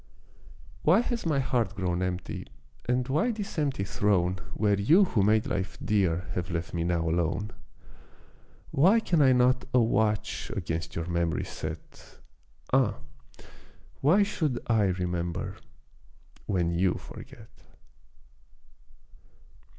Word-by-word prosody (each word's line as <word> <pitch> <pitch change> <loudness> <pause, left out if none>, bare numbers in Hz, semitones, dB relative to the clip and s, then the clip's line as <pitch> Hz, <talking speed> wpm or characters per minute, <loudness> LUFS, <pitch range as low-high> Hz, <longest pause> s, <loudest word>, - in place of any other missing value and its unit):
Why 180 +9 +5
has 240 -6 -3
my 150 -3 +1
heart 125 -3 0
grown 90 -2 -1
empty 90 -4 -4 0.4
and 125 0 0
why 155 - +1
this 210 -7 -4
empty 140 -9 0
throne 95 -2 +1 0.2
Where 105 -1 +2
you 165 - +6
who 115 - 0
made 110 +2 +3
life 95 0 -3
dear 95 -5 +1
have 90 0 -3
left 85 -1 -4
me 85 -1 -1
now 85 -1 0
alone? 85 +5 -1 1.2
Why 185 +11 +5
can 170 -8 +1
I 135 -2 +6
not 125 +1 +3
a - - +7
watch 110 -2 0
against 80 -3 -3
your 80 - -2
mem'ry 85 -1 -1
set? 80 0 -8 0.6
Ah, 130 -5 +3 1.0
why 175 +9 +4
should 155 -11 -1
I 110 -3 +3
remember 90 -2 -2 0.9
when 90 -4 +1
you 90 +2 +1
forget! - - -12
105 Hz, 120 wpm, -28 LUFS, 90-135 Hz, 1.2 s, a